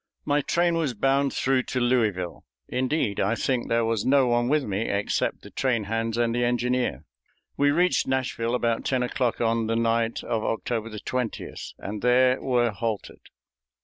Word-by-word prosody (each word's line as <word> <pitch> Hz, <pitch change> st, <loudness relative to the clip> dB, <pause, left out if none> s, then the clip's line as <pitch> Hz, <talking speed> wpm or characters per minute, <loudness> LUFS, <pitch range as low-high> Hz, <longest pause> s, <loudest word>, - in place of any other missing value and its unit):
My 145 Hz, 0 st, +2 dB
train 170 Hz, +3 st, +1 dB
was 150 Hz, -7 st, -1 dB
bound 135 Hz, +4 st, +2 dB
through 130 Hz, -1 st, +1 dB
to 130 Hz, -, -1 dB
Louisville. 110 Hz, -8 st, 0 dB, 0.2 s
Indeed, 130 Hz, -5 st, -1 dB
I 100 Hz, +4 st, +1 dB
think 125 Hz, 0 st, -1 dB
there 115 Hz, 0 st, +2 dB
was 115 Hz, -2 st, 0 dB
no 135 Hz, 0 st, +4 dB
one 120 Hz, 0 st, +1 dB
with 150 Hz, 0 st, +2 dB
me 105 Hz, -1 st, -2 dB
except 100 Hz, +1 st, -1 dB
the -, -, -12 dB
train 125 Hz, -5 st, 0 dB
hands 115 Hz, +2 st, -2 dB
and 120 Hz, -1 st, +1 dB
the 120 Hz, +1 st, 0 dB
engineer. 125 Hz, +1 st, 0 dB, 0.5 s
We 145 Hz, 0 st, +3 dB
reached 175 Hz, +5 st, +2 dB
Nashville 130 Hz, -3 st, -1 dB
about 115 Hz, -2 st, 0 dB
ten 130 Hz, -2 st, 0 dB
o'clock 125 Hz, -1 st, -1 dB
on 115 Hz, -1 st, +1 dB
the 115 Hz, -, 0 dB
night 115 Hz, 0 st, 0 dB
of 110 Hz, -1 st, -2 dB
October 115 Hz, 0 st, -2 dB
20th, 115 Hz, +2 st, -5 dB
and 105 Hz, +1 st, -6 dB
there 125 Hz, +1 st, +4 dB
were 120 Hz, -3 st, +2 dB
halted. 110 Hz, 0 st, -4 dB
120 Hz, 170 wpm, -25 LUFS, 115-130 Hz, 0.5 s, no